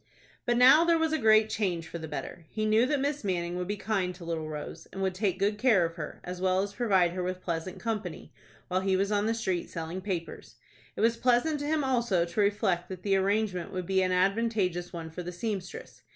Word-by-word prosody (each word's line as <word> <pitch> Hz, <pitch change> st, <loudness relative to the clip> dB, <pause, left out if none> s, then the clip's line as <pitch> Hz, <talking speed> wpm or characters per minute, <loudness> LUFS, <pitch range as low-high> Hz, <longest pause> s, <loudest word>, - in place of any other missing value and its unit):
But 240 Hz, 0 st, +3 dB
now 265 Hz, +6 st, +8 dB
there 335 Hz, -1 st, +4 dB
was 320 Hz, -1 st, +1 dB
a 315 Hz, -, +1 dB
great 220 Hz, 0 st, +5 dB
change 180 Hz, -7 st, -2 dB
for 170 Hz, -, -6 dB
the 160 Hz, -, -6 dB
better. 165 Hz, +1 st, -7 dB
He 215 Hz, -1 st, -2 dB
knew 220 Hz, +3 st, +4 dB
that 290 Hz, 0 st, +1 dB
Miss 285 Hz, 0 st, -1 dB
Manning 175 Hz, -3 st, -1 dB
would 180 Hz, 0 st, -3 dB
be 205 Hz, +1 st, -2 dB
kind 195 Hz, -4 st, -1 dB
to 175 Hz, -1 st, -11 dB
little 160 Hz, -2 st, -3 dB
Rose, 155 Hz, +2 st, -7 dB
and 195 Hz, -, -4 dB
would 190 Hz, -1 st, 0 dB
take 190 Hz, -1 st, 0 dB
good 205 Hz, +2 st, 0 dB
care 220 Hz, -8 st, +4 dB
of 165 Hz, -, -4 dB
her, 160 Hz, -3 st, -7 dB
as 180 Hz, 0 st, -6 dB
well 185 Hz, 0 st, +2 dB
as 200 Hz, 0 st, -5 dB
provide 195 Hz, -7 st, +2 dB
her 180 Hz, +1 st, -3 dB
with 185 Hz, 0 st, -3 dB
pleasant 170 Hz, +1 st, -3 dB
company, 215 Hz, -7 st, -4 dB, 0.3 s
while 185 Hz, +1 st, 0 dB
he 190 Hz, 0 st, +1 dB
was 195 Hz, +2 st, 0 dB
on 205 Hz, 0 st, +1 dB
the 225 Hz, -, +1 dB
street 190 Hz, -6 st, -2 dB
selling 165 Hz, +3 st, -5 dB
papers. 185 Hz, -4 st, -5 dB, 0.4 s
It -, -, -3 dB
was 230 Hz, +1 st, +3 dB
pleasant 255 Hz, +6 st, +2 dB
to 290 Hz, -, -3 dB
him 310 Hz, -1 st, +1 dB
also 235 Hz, -9 st, +1 dB
to 170 Hz, +5 st, -5 dB
reflect 200 Hz, -3 st, +1 dB
that 185 Hz, -1 st, -7 dB
the 195 Hz, -1 st, +2 dB
arrangement 195 Hz, -2 st, 0 dB
would 185 Hz, -1 st, -3 dB
be 190 Hz, +1 st, +2 dB
an 185 Hz, 0 st, +1 dB
advantageous 190 Hz, -2 st, +1 dB
one 165 Hz, -2 st, -7 dB
for 180 Hz, -, -6 dB
the 175 Hz, 0 st, -5 dB
seamstress. 190 Hz, 0 st, -5 dB
190 Hz, 235 wpm, -29 LUFS, 180-220 Hz, 0.4 s, now